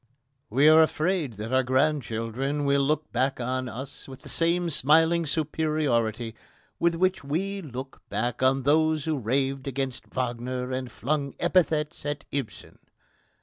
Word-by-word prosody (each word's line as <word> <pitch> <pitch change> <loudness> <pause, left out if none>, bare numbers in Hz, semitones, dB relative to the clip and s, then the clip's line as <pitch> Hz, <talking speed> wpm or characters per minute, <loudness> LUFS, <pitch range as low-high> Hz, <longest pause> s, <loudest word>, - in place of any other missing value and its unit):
We 135 +7 +4
are 155 +1 +8
afraid 160 -3 +1
that 110 +4 -6
our 130 - +5
grandchildren 130 0 0
will 140 0 +3
look 150 +2 0
back 130 +3 0
on 130 +1 -2
us 130 +4 -8
with 135 0 -11
the 170 +1 +1
smiling 160 +4 +4
superiority 140 -7 0 0.5
with 170 0 +2
which 185 +1 +1
we 195 +8 -2
look 135 -3 -8
back 120 +2 -2
on 130 +1 +3
those 155 +1 +2
who 155 -3 0
raved 135 +3 -1
against 135 -1 -3
Wagner 125 0 -3
and 130 -2 -3
flung 140 +6 -2
epithets 165 -3 +1
at 145 0 -4
Ibsen. 130 -9 -5
140 Hz, 140 wpm, -26 LUFS, 125-155 Hz, 0.5 s, are